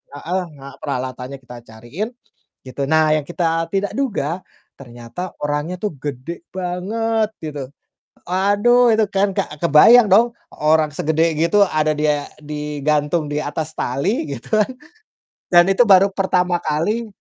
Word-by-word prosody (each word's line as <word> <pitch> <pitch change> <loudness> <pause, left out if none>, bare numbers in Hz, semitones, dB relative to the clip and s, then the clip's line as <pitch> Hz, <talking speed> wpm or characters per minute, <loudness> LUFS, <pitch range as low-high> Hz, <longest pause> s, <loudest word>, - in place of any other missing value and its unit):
ah 145 - -10
heeh, 185 +3 -1
nga 135 -1 -12
peralatannya 130 -1 -5
kita 125 0 -11
cariin, 120 - -6 0.6
gitu. 130 +2 -7
Nah, 155 +1 +3
yang 150 -2 -2
kita 165 -1 -1
tidak 195 0 -2
duga 190 - -2 0.4
ternyata 120 +7 -8
orangnya 150 +4 -2
tuh 205 +3 -3
gede 145 +5 -7
banget 215 +5 -1 0.2
gitu. 145 -4 -5 0.6
Aduh, 205 +7 +3
itu 220 -1 +3
kan, 195 +1 +2
Kak, 150 -1 -3
kebayang 205 +9 +7
dong 230 +5 +4 0.2
orang 155 0 +3
segede 160 +2 0
gitu 170 +6 +3
ada 155 0 +1
dia 150 -1 0 0.2
digantung 150 +1 -1
di 145 - -3
atas 155 +1 -4
tali, 140 - -1
gitu 140 - -2
kan. 215 +4 +1 0.8
Dan, 175 -1 +6
itu 230 +5 +3
baru 195 0 +6
pertama 180 -2 0
kali 170 +9 -1
160 Hz, 140 wpm, -19 LUFS, 145-195 Hz, 0.8 s, kebayang